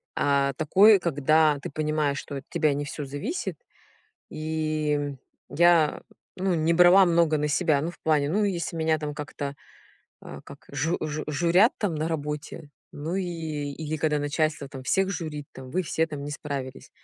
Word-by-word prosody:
а, 140 Hz, -1 st, +2 dB
такой, 195 Hz, +8 st, +5 dB
когда 155 Hz, -1 st, +3 dB
ты -, -, -5 dB
понимаешь, 150 Hz, -1 st, -1 dB
что 140 Hz, -, -7 dB
от -, -, -9 dB
тебя 150 Hz, -2 st, +1 dB
не 145 Hz, -, -2 dB
всё 145 Hz, 0 st, -6 dB
зависит, 145 Hz, -, -4 dB, 0.7 s
и, 155 Hz, -1 st, -2 dB
м, 145 Hz, -2 st, -4 dB, 0.3 s
я 170 Hz, -2 st, +3 dB, 0.4 s
ну 185 Hz, 0 st, +1 dB
не 160 Hz, 0 st, +2 dB
брала 180 Hz, +3 st, +7 dB
много 165 Hz, -2 st, +3 dB
на 150 Hz, 0 st, 0 dB
себя. 155 Hz, -2 st, +2 dB
Ну 160 Hz, +4 st, -2 dB
в -, -, -17 dB
плане, 150 Hz, -3 st, +2 dB
ну 210 Hz, +5 st, +1 dB
если 175 Hz, -4 st, -2 dB
меня 160 Hz, -1 st, +1 dB
там 150 Hz, -1 st, -5 dB
как-то, 145 Hz, -1 st, -5 dB, 0.7 s
а, -, -, -9 dB
как -, -, -13 dB
жу 160 Hz, +6 st, -1 dB
жу 155 Hz, 0 st, -3 dB
журят, 170 Hz, -, +3 dB
там, 200 Hz, -6 st, -1 dB
на 155 Hz, +1 st, -1 dB
работе, 150 Hz, -1 st, -5 dB, 0.2 s
ну 155 Hz, +4 st, -4 dB
и 195 Hz, -, -1 dB, 0.5 s
или 155 Hz, +1 st, -4 dB
когда 150 Hz, -1 st, 0 dB
начальство, 145 Hz, 0 st, -1 dB
там, 135 Hz, -1 st, -9 dB
всех 190 Hz, +8 st, +1 dB
журит, 155 Hz, -5 st, -5 dB
там: 130 Hz, -1 st, -10 dB
"Вы 185 Hz, +7 st, 0 dB
все 160 Hz, -1 st, 0 dB
там 150 Hz, -3 st, -7 dB
не 145 Hz, -, -5 dB
справились". 140 Hz, -3 st, -6 dB
155 Hz, 175 wpm, -26 LUFS, 145-170 Hz, 0.7 s, брала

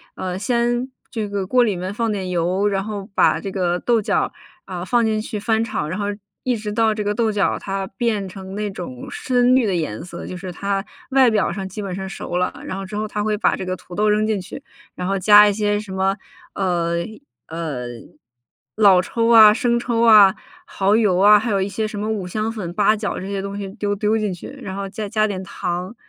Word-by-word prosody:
呃， 185 Hz, -1 st, -4 dB
先 240 Hz, +4 st, 0 dB, 0.2 s
这 220 Hz, -5 st, -4 dB
个 200 Hz, -2 st, -3 dB
锅 250 Hz, +3 st, +4 dB
里 205 Hz, -6 st, 0 dB
面 185 Hz, +2 st, -4 dB
放 230 Hz, 0 st, -1 dB
点 190 Hz, -3 st, -3 dB
油， 180 Hz, +3 st, +1 dB
然 195 Hz, -1 st, 0 dB
后 205 Hz, -1 st, -6 dB
把 -, -, +4 dB
这 195 Hz, -, -5 dB
个 180 Hz, -2 st, 0 dB
豆 235 Hz, -3 st, +2 dB
角， -, -, 0 dB, 0.3 s
啊， 180 Hz, -1 st, -5 dB
放 235 Hz, +5 st, +2 dB
进 215 Hz, -1 st, 0 dB
去 215 Hz, -1 st, -5 dB
翻 220 Hz, +1 st, +1 dB
炒。 150 Hz, -9 st, -3 dB
然 185 Hz, +5 st, -4 dB
后 205 Hz, -1 st, -2 dB, 0.4 s
一 250 Hz, -2 st, +1 dB
直 210 Hz, -1 st, -5 dB
到 220 Hz, 0 st, +2 dB
这 210 Hz, -, -2 dB
个 205 Hz, 0 st, 0 dB
豆 220 Hz, 0 st, +1 dB
角 205 Hz, -1 st, 0 dB
它 195 Hz, -1 st, -3 dB
变 215 Hz, -5 st, 0 dB
成 190 Hz, +1 st, -9 dB
那 210 Hz, -1 st, -3 dB
种 150 Hz, -10 st, -7 dB
深 250 Hz, 0 st, +2 dB
绿 255 Hz, -3 st, +3 dB
的 185 Hz, -, 0 dB
颜 155 Hz, -7 st, -3 dB
色， 180 Hz, -, -8 dB
就 185 Hz, -, -6 dB
是 185 Hz, 0 st, -6 dB
它 195 Hz, +2 st, -2 dB, 0.3 s
外 260 Hz, -2 st, +5 dB
表 210 Hz, -5 st, +1 dB
上 190 Hz, 0 st, -4 dB
基 190 Hz, +3 st, -9 dB
本 195 Hz, -2 st, -4 dB
上 190 Hz, +1 st, -5 dB
熟 175 Hz, -2 st, -4 dB
了， 180 Hz, -, 0 dB
然 185 Hz, -, -4 dB
后 195 Hz, -, -5 dB
之 205 Hz, -, -8 dB
后 215 Hz, +1 st, -2 dB
她 210 Hz, 0 st, -3 dB
会 215 Hz, -1 st, 0 dB
把 -, -, +2 dB
这 190 Hz, -, -5 dB
个 185 Hz, 0 st, -2 dB
土 180 Hz, -, -14 dB
豆 210 Hz, +3 st, +2 dB
扔 210 Hz, +1 st, +2 dB
进 215 Hz, -3 st, 0 dB
去， -, -, -9 dB, 0.3 s
然 180 Hz, -, -4 dB
后 195 Hz, 0 st, 0 dB
加 210 Hz, +2 st, +8 dB
一 -, -, 0 dB
些 205 Hz, 0 st, 0 dB
什 205 Hz, -2 st, -9 dB
么， 190 Hz, +1 st, +1 dB, 0.4 s
呃， 175 Hz, -3 st, 0 dB, 0.5 s
呃， 155 Hz, -7 st, -4 dB, 0.9 s
老 200 Hz, -4 st, +6 dB
抽 230 Hz, +4 st, -1 dB
啊、 220 Hz, -2 st, +8 dB
生 240 Hz, -1 st, +1 dB
抽 235 Hz, -1 st, -1 dB
啊、 210 Hz, -4 st, +8 dB, 0.3 s
耗 200 Hz, +2 st, +1 dB
油 205 Hz, -5 st, +3 dB
啊， 210 Hz, +1 st, +8 dB
还 220 Hz, +1 st, -1 dB
有 195 Hz, -1 st, +1 dB
一 190 Hz, -, 0 dB
些 220 Hz, +2 st, -2 dB
什 210 Hz, -1 st, -6 dB
么 215 Hz, +1 st, -2 dB
五 205 Hz, -4 st, -2 dB
香 215 Hz, +4 st, -2 dB
粉、 185 Hz, -6 st, -5 dB
八 210 Hz, +2 st, +3 dB
角 210 Hz, -1 st, -3 dB
这 190 Hz, -, -6 dB
些 200 Hz, -1 st, -3 dB
东 200 Hz, 0 st, -5 dB
西 200 Hz, -1 st, -4 dB
丢 205 Hz, -2 st, -2 dB
丢 215 Hz, +2 st, +1 dB
进 210 Hz, -3 st, -1 dB
去， 175 Hz, -, -9 dB, 0.2 s
然 190 Hz, 0 st, -5 dB
后 200 Hz, 0 st, -4 dB
再 210 Hz, 0 st, -5 dB
加 215 Hz, -1 st, +2 dB
点 190 Hz, -2 st, -4 dB
糖。 180 Hz, +4 st, -4 dB
205 Hz, 255 characters per minute, -21 LUFS, 190-215 Hz, 0.9 s, 加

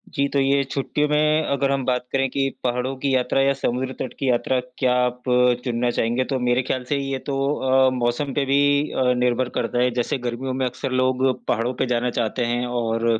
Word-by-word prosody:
जी, 140 Hz, -2 st, +2 dB
तो 140 Hz, -, +2 dB
ये 140 Hz, +1 st, +2 dB
छुट्टियों 140 Hz, +2 st, -1 dB
में 150 Hz, +1 st, +3 dB
अगर 140 Hz, 0 st, +1 dB
हम 135 Hz, -1 st, 0 dB
बात 125 Hz, -1 st, 0 dB
करें 135 Hz, 0 st, +1 dB
कि 135 Hz, +1 st, 0 dB
पहाड़ों 125 Hz, +1 st, -1 dB
की 135 Hz, 0 st, -1 dB
यात्रा 130 Hz, +1 st, +1 dB
या 135 Hz, 0 st, +3 dB
समुद्र 130 Hz, -1 st, -2 dB
तट -, -, -4 dB
की 135 Hz, -, 0 dB
यात्रा 125 Hz, +1 st, +1 dB, 0.2 s
क्या 125 Hz, -2 st, +2 dB
आप 125 Hz, 0 st, -4 dB, 0.4 s
चुनना 120 Hz, -1 st, 0 dB
चाहेंगे? 120 Hz, +2 st, 0 dB
तो 135 Hz, -1 st, -2 dB
मेरे 125 Hz, 0 st, +2 dB
ख़याल 130 Hz, 0 st, -2 dB
से 145 Hz, -, +1 dB
ये 135 Hz, -1 st, -3 dB
तो 140 Hz, -, -1 dB, 0.5 s
अ, -, -, +5 dB
मौसम 125 Hz, +3 st, -1 dB
पे 140 Hz, 0 st, 0 dB
भी 140 Hz, +1 st, +3 dB, 0.3 s
अ, 125 Hz, -1 st, +2 dB
निर्भर 125 Hz, 0 st, +1 dB
करता 120 Hz, +1 st, -1 dB
है, 125 Hz, -, +3 dB
जैसे 120 Hz, +2 st, -1 dB
गर्मियों 130 Hz, +2 st, -3 dB
में 130 Hz, 0 st, -1 dB
अक्सर 130 Hz, +2 st, -4 dB
लोग 130 Hz, 0 st, +1 dB, 0.2 s
पहाड़ों 120 Hz, +2 st, 0 dB
पे 125 Hz, -, -1 dB
जाना 125 Hz, 0 st, 0 dB
चाहते 120 Hz, +2 st, -1 dB
हैं 120 Hz, +1 st, -1 dB
और, 115 Hz, -1 st, 0 dB
130 Hz, 215 wpm, -22 LUFS, 120-135 Hz, 0.5 s, अ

